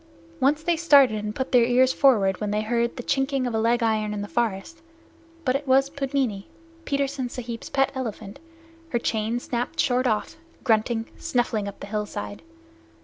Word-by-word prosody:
Once 295 Hz, +4 st, +2 dB
they 345 Hz, +1 st, +2 dB
started 280 Hz, -10 st, +5 dB
and 210 Hz, 0 st, -4 dB
put 260 Hz, -, -3 dB
their 245 Hz, -3 st, +6 dB
ears 255 Hz, +2 st, +3 dB
forward 205 Hz, -9 st, +3 dB
when 210 Hz, -, -1 dB
they 210 Hz, +1 st, 0 dB
heard 235 Hz, +1 st, 0 dB
the 245 Hz, -, -5 dB
chinking 270 Hz, 0 st, 0 dB
of 245 Hz, -, -2 dB
a 220 Hz, -, +1 dB
leg 235 Hz, +2 st, +2 dB
iron 215 Hz, -2 st, 0 dB
in 205 Hz, -, -3 dB
the -, -, -6 dB
forest, 235 Hz, +8 st, -2 dB, 0.6 s
but 255 Hz, 0 st, +2 dB
it 285 Hz, +1 st, -3 dB
was 270 Hz, +1 st, +3 dB
Pudmini, 270 Hz, -8 st, -2 dB, 0.4 s
Petersen 275 Hz, -2 st, -1 dB
Sahib's 235 Hz, -2 st, -6 dB
pet 270 Hz, -1 st, +1 dB
elephant, 220 Hz, -6 st, -6 dB, 0.5 s
her 240 Hz, -, 0 dB
chain 225 Hz, 0 st, -1 dB
snapped 245 Hz, 0 st, -4 dB
short 255 Hz, -1 st, +2 dB
off, 220 Hz, +7 st, -1 dB, 0.3 s
grunting, 225 Hz, 0 st, +1 dB
snuffling 235 Hz, -4 st, -1 dB
up 200 Hz, -, -8 dB
the -, -, -5 dB
hillside. 205 Hz, 0 st, -5 dB
240 Hz, 175 wpm, -25 LUFS, 215-270 Hz, 0.6 s, their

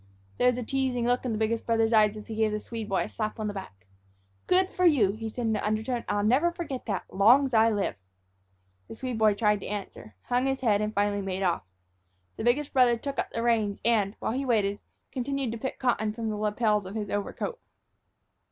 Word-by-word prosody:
There 250 Hz, -, +4 dB
was 250 Hz, -, -1 dB
a 250 Hz, -, -3 dB
teasing 260 Hz, -1 st, -1 dB
look 245 Hz, +1 st, +1 dB
in 245 Hz, -, -1 dB
the 215 Hz, -, -1 dB
biggest 220 Hz, +1 st, 0 dB
brother's 225 Hz, 0 st, +2 dB
eyes 215 Hz, -1 st, +4 dB
as 210 Hz, -, -9 dB
he 225 Hz, -, -7 dB
gave 220 Hz, 0 st, +1 dB
the 210 Hz, -, -2 dB
Swede 225 Hz, 0 st, -6 dB
boy 195 Hz, -, +1 dB
a -, -, -5 dB
slap 215 Hz, 0 st, -4 dB
on 215 Hz, -, -2 dB
the 205 Hz, -, -2 dB
back. 100 Hz, -, -9 dB, 0.6 s
"Good 370 Hz, +1 st, +3 dB
for 365 Hz, -, -2 dB
you!" 275 Hz, -, +5 dB
he 220 Hz, +2 st, -5 dB
said 240 Hz, +2 st, -4 dB
in 220 Hz, -1 st, +1 dB
an -, -, -2 dB
undertone; 220 Hz, +3 st, -1 dB
"I'll 205 Hz, 0 st, +1 dB
never 265 Hz, +11 st, +3 dB
forget 310 Hz, -8 st, -6 dB
that, 200 Hz, -4 st, -1 dB
long 235 Hz, +8 st, +6 dB
's 260 Hz, -, -10 dB
I 225 Hz, 0 st, +5 dB
live." 205 Hz, -3 st, 0 dB, 0.9 s
The -, -, -9 dB
Swede 250 Hz, -1 st, -4 dB
boy 215 Hz, -2 st, +4 dB
tried 210 Hz, -1 st, +2 dB
to -, -, -7 dB
answer, 195 Hz, -, -7 dB
hung 250 Hz, +2 st, 0 dB
his 270 Hz, 0 st, -1 dB
head, 210 Hz, -5 st, +2 dB
and 210 Hz, 0 st, -1 dB
finally 205 Hz, 0 st, +1 dB
made 190 Hz, 0 st, -3 dB
off. 175 Hz, -, +1 dB, 0.7 s
The -, -, -5 dB
biggest 270 Hz, +5 st, +1 dB
brother 250 Hz, -3 st, +4 dB
took 280 Hz, +4 st, -5 dB
up -, -, -1 dB
the 230 Hz, -, -3 dB
reins 220 Hz, -4 st, +1 dB
and, 215 Hz, -3 st, +2 dB
while -, -, -2 dB
he 265 Hz, +4 st, -2 dB
waited, 205 Hz, -6 st, +1 dB, 0.3 s
continued 270 Hz, -1 st, -2 dB
to 230 Hz, -, -5 dB
pick 265 Hz, -, -4 dB
cotton 220 Hz, -4 st, 0 dB
from 225 Hz, -1 st, -3 dB
the -, -, -3 dB
lapels 210 Hz, -1 st, 0 dB
of 195 Hz, -, -8 dB
his 210 Hz, -2 st, -3 dB
overcoat. 205 Hz, -, -3 dB
225 Hz, 230 wpm, -27 LUFS, 210-250 Hz, 0.9 s, long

